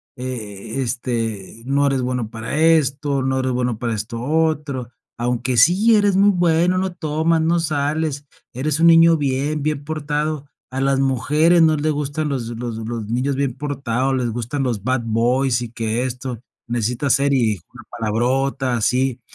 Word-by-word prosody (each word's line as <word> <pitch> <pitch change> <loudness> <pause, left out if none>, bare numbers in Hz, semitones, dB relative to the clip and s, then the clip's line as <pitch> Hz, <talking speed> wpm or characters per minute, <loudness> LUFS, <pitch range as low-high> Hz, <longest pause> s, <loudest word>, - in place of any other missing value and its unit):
eh, 115 -2 -5
este, 115 -4 -3
no 140 +1 +2
eres 135 -2 +1
bueno 125 -3 -2
para 115 +5 -5
esto, 145 -3 +2
no 130 0 0
eres 130 0 0
bueno 125 -2 -1
para 115 -2 -2
esto 115 +2 -5
otro, 150 -4 -1 0.3
aunque 125 +1 -1
sí 185 - +5
eres 205 -2 +3
muy 200 +1 +5
bueno, 175 -1 +2
no 190 -1 -1
tomas, 160 0 0
no 170 +2 +2
sales, 150 -1 -1 0.3
eres 145 +4 -1
un 170 - +5
niño 165 0 +7
bien 145 +1 -1
bien 150 -1 -2
portado. 150 -1 -2 0.2
A 130 +1 -3
las 135 0 +2
mujeres 145 +6 +3
no 155 -1 +4
le 155 +2 0
gustan 150 +1 -2
los 125 -5 -3
los 120 0 -5
los 115 -1 -4
niños 125 +5 -1
bien 140 -3 0
portados, 135 -2 -1
les 125 -2 -1
gustan 120 +5 -3
los 115 -6 -2
bad 130 0 0
boys 120 +3 +1
y 115 - -6
que 115 +1 -2
esto. 125 -2 -4 0.3
Necesitas 120 +3 0
ser", 140 +1 +2
y 130 - +3
dijo 105 -6 -1
una - - -12
palabrota, 125 +4 0
así. 125 +2 0
135 Hz, 170 wpm, -20 LUFS, 120-150 Hz, 0.3 s, niño